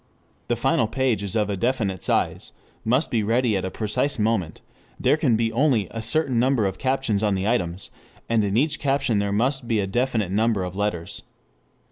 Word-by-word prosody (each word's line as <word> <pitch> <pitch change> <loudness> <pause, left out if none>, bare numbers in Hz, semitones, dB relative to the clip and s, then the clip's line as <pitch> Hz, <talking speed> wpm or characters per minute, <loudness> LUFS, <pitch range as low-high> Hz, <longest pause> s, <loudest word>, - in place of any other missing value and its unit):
The - - +1
final 115 - +1
page 125 -2 0
is 100 +1 -4
of 105 -2 +1
a - - -1
definite 100 -4 -1
size, - - -1 0.3
must 130 +4 +1
be 115 -4 +1
ready 115 +1 +1
at 95 - -1
a - - -2
precise 115 +8 -2
moment; 105 -7 -1 0.4
there - - +3
can 140 -7 +2
be 115 0 0
only 120 - +2
a 115 - -5
certain 130 +1 +2
number 125 -3 +2
of 95 -1 -3
captions 130 -6 0
on 105 -2 +1
the 95 +2 -1
items, 95 -6 -1 0.4
and 115 -2 +2
in 100 +1 0
each 155 +4 +1
caption 135 -6 +1
there 100 0 -1
must 125 +4 0
be 115 -3 +1
a 100 - 0
definite 115 -2 -1
number 110 -1 +1
of 90 0 -5
letters. 100 -5 -3
110 Hz, 195 wpm, -23 LUFS, 100-130 Hz, 0.4 s, there